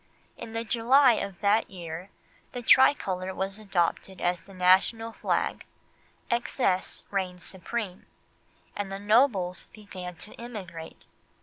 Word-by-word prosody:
In 230 -1 -9
the 230 0 -2
July 245 +3 +5
of 200 -4 -4
that 210 +2 +3
year 175 0 -7 0.4
the 245 - -5
tricolour 190 -8 +4
was 195 +2 -3
adopted 190 -2 -1
as 175 -1 0
the 195 - -16
national 190 +5 +3
flag, - - -1 0.7
excess 235 -5 0
reigned 185 -2 -2
supreme, 190 0 -5 0.7
and 200 -1 -4
the 195 - -3
nobles 205 -3 +2
began 185 -4 -8
to 205 - -12
emigrate. 190 -9 -8
195 Hz, 120 wpm, -28 LUFS, 180-225 Hz, 0.7 s, July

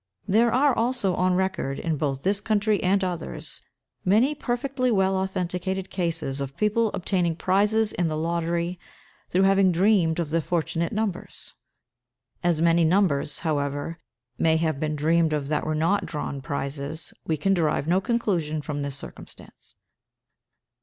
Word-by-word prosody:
There 230 +4 +4
are 275 +1 +3
also 230 -5 +1
on 180 +1 +2
record, 190 -7 -1
in 165 -2 -1
both 140 -2 -2
this 200 +2 +1
country 210 -1 +1
and 195 +1 +2
others, 170 - -4 0.4
many 220 +10 +3
perfectly 255 -1 -1
well 195 -3 +2
authenticated 190 0 -2
cases 165 -6 -2
of 135 0 -5
people 215 +1 +2
obtaining 180 -3 0
prizes 205 +5 +2
in 175 - 0
the 155 -1 -2
lottery, 170 +2 -1 0.5
through 185 +2 +2
having 195 -1 +4
dreamed 180 -2 +3
of 165 -3 -2
the 165 +1 +2
fortunate 170 0 -1
numbers. 210 -4 -3 0.9
As 170 -2 +2
many 170 0 +4
numbers, 160 -5 +3
however, 145 0 -2 0.4
may 160 0 +3
have 160 -3 0
been 155 0 -1
dreamed 160 +2 +2
of 145 -2 -2
that 155 0 -1
were 155 - 0
not 165 +6 +1
drawn 145 -3 -4
prizes, 140 +3 -4
we 160 - +1
can 195 +7 +2
derive 155 -4 0
no 180 +3 +3
conclusion 175 -10 -1
from 145 -1 -4
this 140 -1 -3
circumstance. - - -12
175 Hz, 150 wpm, -25 LUFS, 155-195 Hz, 0.9 s, There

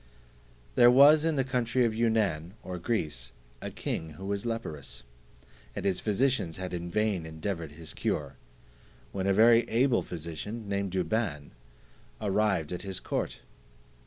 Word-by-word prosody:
There 120 - +7
was 145 +5 +7
in 165 -1 +1
the 135 - +2
country 125 -1 +1
of 115 - +1
Yunaun 105 -8 +1
or 90 -1 -5
Greece, 75 - -2 0.3
a - - -4
king 80 -1 -4
who 95 +6 -9
was 100 +3 -2
leprous, 75 - -5 0.7
and - - -4
his 95 -2 +1
physicians 110 -5 0
had 95 -1 -5
in 85 0 -4
vain 105 -2 0
endeavoured 80 0 -4
his 80 +1 -8
cure; 70 -2 -2 0.8
when 95 -1 -2
a - - +4
very 115 +3 +7
able 125 +2 +3
physician, 90 +7 -6
named 100 -2 -2
Douban, 90 -5 -1 0.7
arrived 100 -6 +1
at 90 - -4
his 95 -2 -5
court. - - -3
100 Hz, 145 wpm, -29 LUFS, 80-115 Hz, 0.8 s, There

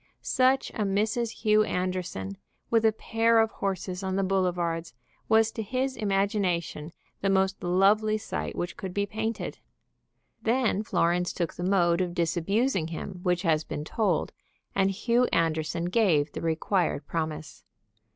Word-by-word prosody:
Such 260 +1 +2
a - - -4
Mrs. 215 +4 0
Hugh 215 -1 +5
Anderson, 180 - -3 0.4
with 225 -1 +3
a 220 - +6
pair 225 +1 +2
of 225 0 +3
horses 190 -1 -3
on 190 -1 -2
the 195 - +1
boulevards, 175 -5 -1 0.3
was 220 0 +4
to 225 - -4
his 260 +5 -2
imagination 195 -6 -1 0.3
the 195 - +1
most 190 0 +1
lovely 205 +4 +3
sight 215 - -4
which 175 0 -4
could 185 -2 -6
be 200 0 +1
painted. 220 +2 -4 0.8
Then 230 -3 +1
Florence 175 -4 +1
took 170 -3 -2
the - - -8
mode 180 -2 +3
of 175 -1 -2
disabusing 180 +4 +1
him 175 +3 -6
which 180 0 0
has 160 -3 +2
been 150 - -5
told, 185 -1 0 0.4
and 195 0 +2
Hugh 235 +5 +2
Anderson 165 -2 0
gave 175 -7 +2
the - - -6
required 165 -1 0
promise. 155 -1 -4
190 Hz, 145 wpm, -27 LUFS, 170-215 Hz, 0.8 s, a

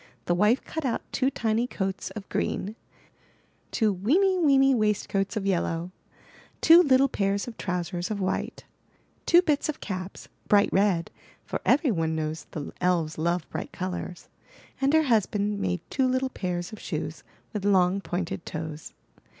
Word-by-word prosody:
The - - +2
wife 210 +8 +3
cut 320 - -5
out 250 -4 -1
two 265 0 +1
tiny 230 -2 0
coats 190 -5 -3
of 200 -3 -7
green, 210 +3 -2 0.9
two 215 -3 +1
weeny, 360 - +2
weeny 275 -4 +5
waistcoats 210 -2 0
of 200 - -2
yellow, 175 -2 -1 0.7
two 335 +2 +8
little 275 -4 +4
pairs 200 -3 -1
of 235 - -7
trousers 175 -2 -3
of 210 -2 -2
white, 190 0 -2 0.6
two 350 +1 +6
bits 300 -3 +1
of 305 - -3
caps, 185 -2 -6 0.2
bright 205 -1 +4
red 190 -4 +2 0.3
(for - - -4
every 280 -1 +4
one 165 -4 0
knows 155 0 -3
the 150 -3 -6
elves 170 -4 +1
love 170 +1 0
bright 160 - -5
colors), 180 -1 -5 0.5
and 270 +1 +3
her 315 - +5
hus 225 -8 +3
band 205 0 -1
made 180 -3 -1
two 265 -1 +2
little 260 +1 0
pairs 180 -2 -3
of 215 - -8
shoes 155 -1 -5 0.3
with 210 -3 -3
long, 190 -1 +3
pointed 175 -2 -3
toes. 155 -1 -6
200 Hz, 160 wpm, -27 LUFS, 175-250 Hz, 0.9 s, two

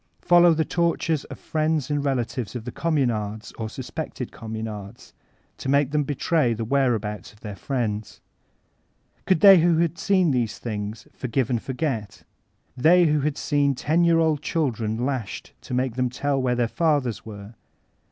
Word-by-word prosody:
Follow 175 -1 +6
the 160 0 +1
tor 170 +1 +1
tures 160 -3 -1
of - - -9
friends 155 -3 -1
and 145 -1 0
relatives 125 -4 -2
of 115 -2 -5
Communards 110 -10 -1
or 110 -1 -3
sus 125 +2 -8
pected 155 -6 -5
Communards, 110 -1 -7 0.5
to 135 - -4
make 140 0 +3
them 150 0 +1
betray 145 -2 +1
the 115 0 -4
where 135 0 +2
abouts 105 -3 -5
of 105 - -23
their 105 -2 -7
friends. 110 -3 -3 1.1
Could 185 -4 +3
they 195 -3 +9
who 170 0 +3
had 170 0 0
seen 185 -5 +3
these 120 -4 -1
thmgs 105 -1 -5
''forgive 125 0 -2
and 120 -2 0
forget"? 125 -7 -4 0.5
They 170 +7 +5
who 150 -1 +2
had 150 +1 -1
seen 145 -2 +1
ten 160 +7 +1
year 170 -1 +4
old 160 -3 +2
children 115 -10 -1
lasbed 130 -7 -4
to 125 - -5
make 130 -1 0
them 125 +1 0
tell 135 +2 -1
where 125 -1 +1
their 120 -1 +1
fathers 140 - 0
were? 105 0 -10
130 Hz, 170 wpm, -24 LUFS, 110-155 Hz, 1.1 s, they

